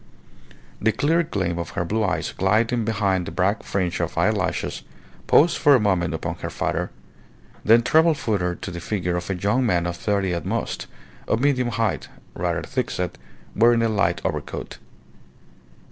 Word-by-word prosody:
The 110 - +3
clear 145 +9 +2
gleam 95 - -2
of 85 - -4
her 85 - 0
blue 110 +5 0
eyes 95 -3 -1
gliding 110 +5 +2
behind 100 -5 0
the - - -5
black 100 +3 +1
fringe 90 -3 -2
of - - -3
eyelashes - - 0 0.5
paused 165 +4 +5
for 145 -2 +6
a - - +4
moment 95 -5 +1
upon - - -4
her - - -5
father, - - -2 0.7
then 115 +2 +5
travelled 160 +3 +4
further 100 -8 -1
to 95 - -7
the 85 - -6
figure 90 -1 -2
of 85 +1 -4
a 95 - 0
young 105 +8 +1
man 90 -7 +1
of 85 0 -2
thirty 95 0 0
at 85 -2 -3
most, - - -3 0.4
of 110 - +1
medium 130 -2 +2
height, 115 -2 -1 0.3
rather - - -2
thick - - -2
set, 90 -2 -3 0.4
wearing 115 +1 +4
a 115 - +2
light 90 -5 +1
overcoat. - - -4
105 Hz, 170 wpm, -23 LUFS, 90-115 Hz, 0.7 s, for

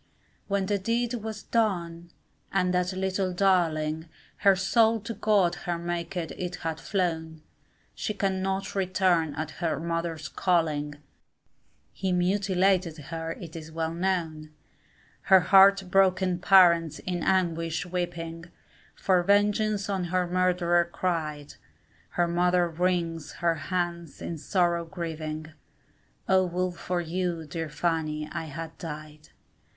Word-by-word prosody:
When 200 -1 0
the 200 +1 0
deed 230 +4 0
was 220 -2 -5
done, 175 -7 -1 0.4
and 180 -2 +1
that 180 0 +1
little 190 0 -1
darling, 165 -4 +1 0.3
Her 195 -1 +5
soul 220 +4 +3
to 230 +2 -5
God 205 -6 +2 0.2
her 170 - 0
Maker 170 +1 -3
it 180 0 -3
had 160 -1 -2
flown, 160 -4 -2 0.5
She 215 - -3
cannot 195 -1 -1
return 185 -5 +1
at 155 0 -4
her 165 -4 0
mother's 165 -2 -3
calling, 155 -4 0 1.0
He 190 -1 -2
mutilated 185 -1 +2
her 165 +2 -5
it 165 -2 -10
is 160 -1 -8
well 160 0 -2
known; 165 -4 -2 0.8
Her 190 -1 +8
heart 195 +1 +6
broken 185 -1 +3
parents 175 -4 +5
in 180 -2 -4
anguish 165 -3 0
weeping, 170 -2 -4 0.5
For 185 -2 +2
vengeance 205 +2 +2
on 190 -3 -1
her 180 +1 0
murderer 175 -1 +2
cried, 155 -5 -2 0.6
Her 175 -1 +1
mother 175 +1 +2
wrings 170 -1 -1
her 170 -1 +1 0.2
hands 175 -3 -2
in 165 -2 -5
sorrow 175 0 +1
grieving, 160 -2 -5 0.7
Oh 190 -1 +4
would 180 +1 -1
for 175 0 -2
you, 170 -1 -2
dear 160 +2 -4
Fanny, 155 -1 -1
I 160 - -4
had 160 +1 -7
died. 155 -1 -8
175 Hz, 125 wpm, -27 LUFS, 165-190 Hz, 1.0 s, Her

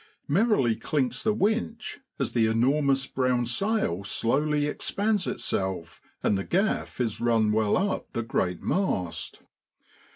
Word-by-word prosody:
Merrily 160 - +3
clinks 130 -3 -1
the 215 - +2
winch 220 +2 -1 0.2
as - - -1
the 115 -2 +3
enormous 135 +4 +2
brown 125 -2 0
sail 120 - 0
slowly 145 +8 +1
expands 200 +6 0
itself, 95 -4 -2 0.2
and 105 - +3
the - - -2
gaff 195 - 0
is 115 -4 -1
run 115 -2 +3
well 105 -1 +2
up 195 +1 -1
the 115 - -1
great 90 -5 -1
mast. 90 - -1
130 Hz, 130 wpm, -27 LUFS, -, 0.2 s, Merrily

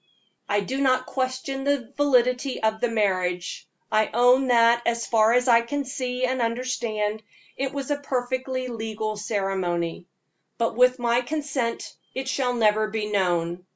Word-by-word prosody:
I 205 0 +2
do 265 +7 -3
not 255 -1 +2
question 260 +1 -3
the 280 -3 -1
validity 255 -2 +2
of 220 0 +1
the 245 - +3
marriage. 185 -5 -1 0.2
I 215 0 +2
own 250 +3 +4
that, 235 -1 +5
as 235 0 0
far 220 0 +3
as 250 +1 +2
I 235 -1 +6
can 285 +4 -3
see 255 -1 -2
and 255 0 -1
understand, 230 -3 -2 0.3
it 270 0 -2
was 280 0 -4
a 290 - +1
perfectly 255 -1 -2
legal 220 -2 -4
ceremony; 190 -5 -2 0.5
but 230 -1 0
with 250 +1 +4
my 240 0 +1
consent 275 -4 -3 0.2
it 265 0 -3
shall 255 -2 0
never 215 -2 +3
be 215 -1 -3
known. 175 -3 0
240 Hz, 155 wpm, -25 LUFS, 215-260 Hz, 0.5 s, I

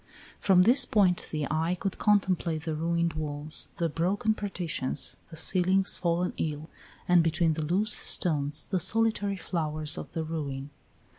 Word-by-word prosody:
From 185 -2 +4
this 245 +7 +5
point 190 -4 +1
the 150 -2 -3
eye 165 +3 0
could 195 - -4
contemplate 185 -6 +1
the 160 -1 -3
ruined 170 +1 -1
walls, 150 0 -1
the 170 - 0
broken 185 +7 0
partitions, 175 -10 -3
the 165 - -11
ceilings 185 +3 +2
fallen 175 +1 -1
in, 155 0 -3 0.4
and 180 -1 +5
between 165 0 +1
the 155 0 -3
loose 200 +7 +1
stones 150 -3 +2
the 190 - -1
solitary 210 -1 +1
flowers 155 -4 -2
of - - -10
the 165 - -2
ruin. 145 -3 -5
170 Hz, 150 wpm, -28 LUFS, 155-190 Hz, 0.4 s, this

